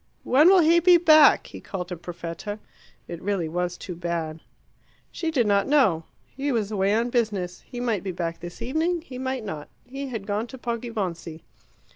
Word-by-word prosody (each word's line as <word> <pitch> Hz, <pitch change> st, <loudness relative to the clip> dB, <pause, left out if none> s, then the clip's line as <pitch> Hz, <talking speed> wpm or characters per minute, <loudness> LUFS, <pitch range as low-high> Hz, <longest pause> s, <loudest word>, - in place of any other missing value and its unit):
"When 295 Hz, +7 st, +5 dB
will 380 Hz, -1 st, +7 dB
he 335 Hz, +2 st, +5 dB
be 350 Hz, +1 st, +6 dB
back?" 310 Hz, -3 st, +6 dB
he -, -, -10 dB
called 180 Hz, -2 st, -6 dB
to 180 Hz, -, -4 dB
Perfetta. 175 Hz, +4 st, -6 dB, 0.5 s
It 170 Hz, -1 st, -7 dB
really 195 Hz, -4 st, -1 dB
was 180 Hz, +2 st, -2 dB
too 180 Hz, -, -7 dB
bad. 165 Hz, -2 st, -3 dB, 0.7 s
She 330 Hz, -, -3 dB
did 265 Hz, -7 st, +2 dB
not 200 Hz, -1 st, +2 dB
know. 220 Hz, -, +3 dB, 0.2 s
He 280 Hz, +2 st, -4 dB
was 220 Hz, -4 st, -1 dB
away 200 Hz, 0 st, +1 dB
on 235 Hz, +2 st, 0 dB
business. 205 Hz, -7 st, -1 dB
He 245 Hz, -, -7 dB
might 230 Hz, -6 st, 0 dB
be 190 Hz, -, -4 dB
back 170 Hz, -2 st, -4 dB
this 175 Hz, +1 st, -8 dB
evening, 320 Hz, +7 st, 0 dB
he 255 Hz, -6 st, -9 dB
might 260 Hz, -3 st, -3 dB
not. 155 Hz, -7 st, -6 dB, 0.2 s
He 275 Hz, +2 st, -6 dB
had 225 Hz, -6 st, -5 dB
gone 210 Hz, +3 st, -2 dB
to 260 Hz, -, -10 dB
Poggibonsi. 210 Hz, -10 st, -4 dB
210 Hz, 185 wpm, -25 LUFS, 175-260 Hz, 0.7 s, will